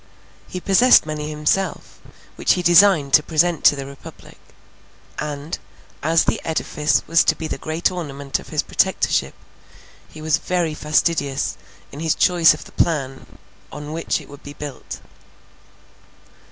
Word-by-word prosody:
He 180 Hz, -, -6 dB
possessed 200 Hz, +6 st, +5 dB
many 150 Hz, -1 st, -5 dB
himself, 150 Hz, +6 st, -2 dB, 0.4 s
which -, -, +2 dB
he 180 Hz, -, -2 dB
designed 170 Hz, -4 st, +5 dB
to 150 Hz, -, +7 dB
present 165 Hz, +2 st, 0 dB
to -, -, +7 dB
the 135 Hz, -1 st, -6 dB
Republic; 140 Hz, 0 st, -13 dB, 0.8 s
and, 150 Hz, +1 st, -5 dB, 0.4 s
as 160 Hz, +2 st, +3 dB
the -, -, -1 dB
edifice 155 Hz, -1 st, 0 dB
was 165 Hz, -, +3 dB
to -, -, +3 dB
be 160 Hz, -, -7 dB
the 135 Hz, -, -5 dB
great 160 Hz, +5 st, -1 dB
ornament 140 Hz, -6 st, -4 dB
of -, -, -13 dB
his -, -, -1 dB
Protectorship, -, -, 0 dB, 0.7 s
he 155 Hz, -, -13 dB
was 155 Hz, 0 st, 0 dB
very 175 Hz, -3 st, -1 dB
fastidious 150 Hz, -6 st, 0 dB, 0.4 s
in 140 Hz, -, -9 dB
his 160 Hz, -1 st, 0 dB
choice 170 Hz, -3 st, +4 dB
of 150 Hz, -, -11 dB
the -, -, -14 dB
plan 135 Hz, -, -2 dB, 0.3 s
on 150 Hz, +1 st, -7 dB
which 165 Hz, +1 st, -2 dB
it -, -, -13 dB
would 145 Hz, 0 st, -13 dB
be 145 Hz, -, -10 dB
built. 145 Hz, -2 st, -8 dB
155 Hz, 150 wpm, -20 LUFS, 145-170 Hz, 0.8 s, to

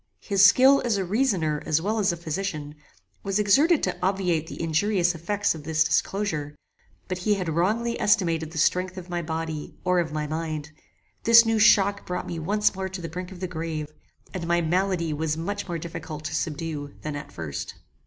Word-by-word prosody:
His 200 Hz, -2 st, +3 dB
skill 260 Hz, +7 st, +7 dB
as 230 Hz, -4 st, +1 dB
a 190 Hz, -, -1 dB
reasoner 180 Hz, -, 0 dB
as 155 Hz, -1 st, +1 dB
well 215 Hz, +6 st, -1 dB
as 195 Hz, -3 st, +2 dB
a 170 Hz, -, -4 dB
physician, 155 Hz, -3 st, -4 dB, 0.5 s
was 195 Hz, 0 st, -1 dB
exerted 280 Hz, -, +4 dB
to 185 Hz, -, 0 dB
obviate 180 Hz, -4 st, 0 dB
the -, -, -8 dB
injurious 175 Hz, +3 st, +1 dB
effects 200 Hz, +5 st, -1 dB
of 160 Hz, -2 st, -9 dB
this 160 Hz, +1 st, +2 dB
disclosure; 160 Hz, -3 st, -1 dB, 0.5 s
but 185 Hz, -1 st, -3 dB
he 210 Hz, +3 st, +2 dB
had 185 Hz, -3 st, -3 dB
wrongly 215 Hz, +9 st, 0 dB
estimated 165 Hz, -6 st, +2 dB
the 160 Hz, -, -9 dB
strength 180 Hz, +4 st, +1 dB
of 180 Hz, -1 st, -8 dB
my 175 Hz, 0 st, -1 dB
body 160 Hz, -2 st, -4 dB
or 180 Hz, -1 st, +2 dB
of 165 Hz, -3 st, -1 dB
my 150 Hz, 0 st, -2 dB
mind. 155 Hz, 0 st, -4 dB, 0.5 s
This 230 Hz, 0 st, +8 dB
new 225 Hz, -1 st, +1 dB
shock 200 Hz, -1 st, +5 dB
brought 180 Hz, 0 st, -3 dB
me 170 Hz, -, -5 dB
once 205 Hz, +6 st, +1 dB
more 190 Hz, 0 st, -4 dB
to 190 Hz, 0 st, -6 dB
the 165 Hz, -, -5 dB
brink 180 Hz, +2 st, -6 dB
of 185 Hz, -1 st, -11 dB
the 185 Hz, -, -2 dB
grave, 160 Hz, -3 st, -5 dB, 0.4 s
and 175 Hz, -3 st, -4 dB
my 170 Hz, 0 st, +3 dB
malady 175 Hz, -1 st, 0 dB
was 155 Hz, +1 st, -1 dB
much 205 Hz, +5 st, -4 dB
more 170 Hz, -2 st, -3 dB
difficult 155 Hz, -2 st, -7 dB
to -, -, -3 dB
subdue 150 Hz, -2 st, -4 dB
than 150 Hz, -1 st, -4 dB
at 145 Hz, -, -7 dB
first. 75 Hz, -4 st, -6 dB
175 Hz, 195 wpm, -25 LUFS, 160-200 Hz, 0.5 s, This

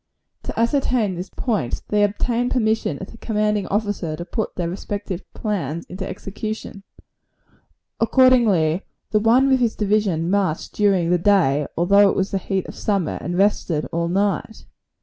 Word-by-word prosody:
To -, -, -4 dB
ascertain 235 Hz, -4 st, +1 dB
this 180 Hz, +2 st, -6 dB
point, 210 Hz, -, -2 dB
they 210 Hz, 0 st, +3 dB
obtained 235 Hz, +4 st, 0 dB
permission 220 Hz, -, 0 dB
of 190 Hz, -, -8 dB
the 230 Hz, -, -13 dB
commanding 210 Hz, -2 st, 0 dB
officer 205 Hz, -6 st, -2 dB
to 170 Hz, +2 st, -7 dB
put 220 Hz, +4 st, -3 dB
their 175 Hz, -2 st, -2 dB
respective 195 Hz, +1 st, -5 dB
plans 170 Hz, -, -3 dB
into 190 Hz, +1 st, -5 dB
execution. 215 Hz, 0 st, -6 dB, 1.2 s
Accordingly, 225 Hz, -, +4 dB, 0.3 s
the 215 Hz, -, +3 dB
one 235 Hz, +5 st, +4 dB
with 265 Hz, -1 st, +3 dB
his 235 Hz, -3 st, +1 dB
division 200 Hz, -5 st, 0 dB
marched 195 Hz, -6 st, 0 dB
during 190 Hz, -5 st, +2 dB
the 180 Hz, -, +3 dB
day, 165 Hz, -7 st, +3 dB
although 200 Hz, +4 st, +5 dB
it -, -, -1 dB
was 190 Hz, +1 st, -1 dB
in 195 Hz, -, +1 dB
the -, -, -20 dB
heat 190 Hz, -2 st, -1 dB
of -, -, -8 dB
summer, 195 Hz, -6 st, -1 dB
and 175 Hz, 0 st, -3 dB
rested 185 Hz, -6 st, +1 dB
all 170 Hz, 0 st, -1 dB
night. 195 Hz, +3 st, -1 dB
200 Hz, 160 wpm, -21 LUFS, 175-220 Hz, 1.2 s, although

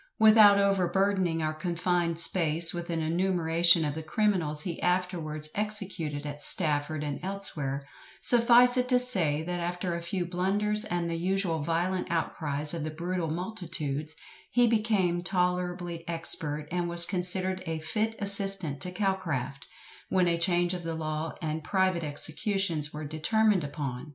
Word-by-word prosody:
Without 215 Hz, -2 st, +7 dB
overburdening 190 Hz, -3 st, +1 dB
our 155 Hz, 0 st, -1 dB
confined 175 Hz, 0 st, -1 dB
space 165 Hz, -1 st, +2 dB
with 175 Hz, 0 st, -6 dB
an 165 Hz, -1 st, -2 dB
enumeration 170 Hz, -1 st, +3 dB
of 145 Hz, -, -2 dB
the 160 Hz, -, -6 dB
criminals 160 Hz, -4 st, 0 dB
he 175 Hz, -3 st, -5 dB
afterwards 175 Hz, -4 st, -1 dB
executed 190 Hz, -8 st, -3 dB
at 145 Hz, 0 st, -6 dB
Stafford 150 Hz, -3 st, +3 dB
and 145 Hz, -2 st, -4 dB
elsewhere, 150 Hz, -8 st, -3 dB, 0.3 s
suffice 245 Hz, +1 st, +5 dB
it 250 Hz, 0 st, 0 dB
to 250 Hz, -, +4 dB
say, 180 Hz, -12 st, +4 dB
that 175 Hz, +1 st, -4 dB
after 175 Hz, +1 st, -3 dB
a 170 Hz, -, -4 dB
few 175 Hz, +1 st, -3 dB
blunders 205 Hz, +5 st, -1 dB
and 175 Hz, -4 st, -2 dB
the 170 Hz, -, -3 dB
usual 185 Hz, -2 st, -1 dB
violent 175 Hz, +4 st, -2 dB
outcries 150 Hz, -3 st, -1 dB
of 165 Hz, -3 st, -4 dB
the 155 Hz, -, -3 dB
brutal 170 Hz, +1 st, -4 dB
multitudes, 160 Hz, -5 st, -4 dB, 0.3 s
he 245 Hz, 0 st, +3 dB
became 210 Hz, -6 st, +1 dB
tolerably 180 Hz, -1 st, -2 dB
expert, 155 Hz, -2 st, 0 dB
and 175 Hz, -1 st, -2 dB
was 170 Hz, 0 st, +6 dB
considered 185 Hz, 0 st, 0 dB
a 160 Hz, 0 st, -2 dB
fit 215 Hz, +8 st, -2 dB
assistant 195 Hz, -7 st, -2 dB
to 180 Hz, -, -2 dB
Calcraft, 165 Hz, -9 st, -3 dB, 0.4 s
when 185 Hz, -2 st, +2 dB
a 170 Hz, -1 st, 0 dB
change 175 Hz, 0 st, +1 dB
of 180 Hz, -, -5 dB
the 165 Hz, -1 st, -5 dB
law 155 Hz, 0 st, -4 dB
and 155 Hz, 0 st, -3 dB
private 185 Hz, 0 st, 0 dB
executions 160 Hz, +1 st, -1 dB
were 150 Hz, 0 st, -7 dB
determined 190 Hz, +6 st, +1 dB
upon. 140 Hz, -2 st, -6 dB
175 Hz, 150 wpm, -28 LUFS, 155-190 Hz, 0.4 s, Without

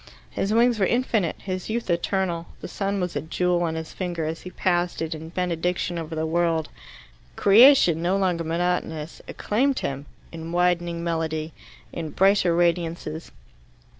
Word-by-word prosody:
His 195 Hz, -, -2 dB
wings 235 Hz, 0 st, +3 dB
were 190 Hz, -, +3 dB
infinite, 230 Hz, -8 st, 0 dB
his 185 Hz, 0 st, -5 dB
youth 230 Hz, +1 st, -2 dB
eternal; 170 Hz, -1 st, -1 dB
the -, -, -7 dB
sun 200 Hz, 0 st, -2 dB
was 180 Hz, -3 st, -3 dB
a 145 Hz, -, -1 dB
jewel 175 Hz, +3 st, 0 dB
on 165 Hz, -2 st, -1 dB
his 160 Hz, 0 st, -6 dB
finger 175 Hz, -3 st, -3 dB
as 160 Hz, +1 st, -4 dB
he 185 Hz, -, -8 dB
passed 175 Hz, -1 st, 0 dB
it 165 Hz, 0 st, -2 dB
in 160 Hz, 0 st, -8 dB
benediction 175 Hz, 0 st, -1 dB
over 160 Hz, 0 st, -6 dB
the 160 Hz, 0 st, -1 dB
world. 165 Hz, -1 st, 0 dB, 0.7 s
Creation, 205 Hz, -, +6 dB
no 180 Hz, +3 st, +1 dB
longer 180 Hz, -4 st, 0 dB
monotonous, 165 Hz, -2 st, -2 dB
acclaimed 260 Hz, +6 st, 0 dB
him, 140 Hz, +1 st, -4 dB, 0.2 s
in 165 Hz, 0 st, -7 dB
widening 175 Hz, -1 st, +1 dB
melody, 160 Hz, -1 st, -2 dB, 0.4 s
in 165 Hz, -2 st, -4 dB
brighter 190 Hz, -1 st, +3 dB
radiances. 170 Hz, -2 st, -1 dB
175 Hz, 155 wpm, -24 LUFS, 165-185 Hz, 0.7 s, Creation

